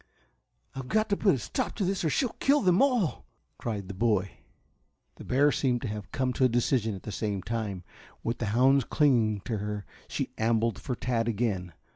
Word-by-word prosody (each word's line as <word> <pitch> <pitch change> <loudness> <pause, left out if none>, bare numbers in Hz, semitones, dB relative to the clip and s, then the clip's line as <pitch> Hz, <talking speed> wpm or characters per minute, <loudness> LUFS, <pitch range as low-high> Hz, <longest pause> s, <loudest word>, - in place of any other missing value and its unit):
"I've 135 -2 -6
got 215 - +1
to 200 - +3
put 195 -4 +3
a - - -2
stop 115 - -3
to 195 - -1
this 190 0 -1
or 160 - +2
she'll 240 - 0
kill 285 +2 +4
them 185 +1 +4
all," 250 - +1 0.3
cried 105 -5 -4
the 100 - -6
boy. 100 -2 +1 0.9
The - - -9
bear 145 +3 +3
seemed 125 -4 0
to - - -1
have 105 -2 -6
come 130 -1 0
to 130 - 0
a 130 - +6
decision 120 -2 +1
at 95 - -10
the 105 - -5
same 100 -1 -2
time. 105 -5 -3 0.4
With 115 +1 -2
the 115 - -1
hounds 130 +5 +4
clinging 115 -8 +2
to 110 +1 -3
her, 105 0 -4 0.2
she - - -3
ambled 115 0 +1
for 130 - -3
Tad 120 -1 -1
again. 100 -6 -1
115 Hz, 200 wpm, -28 LUFS, 105-140 Hz, 0.9 s, a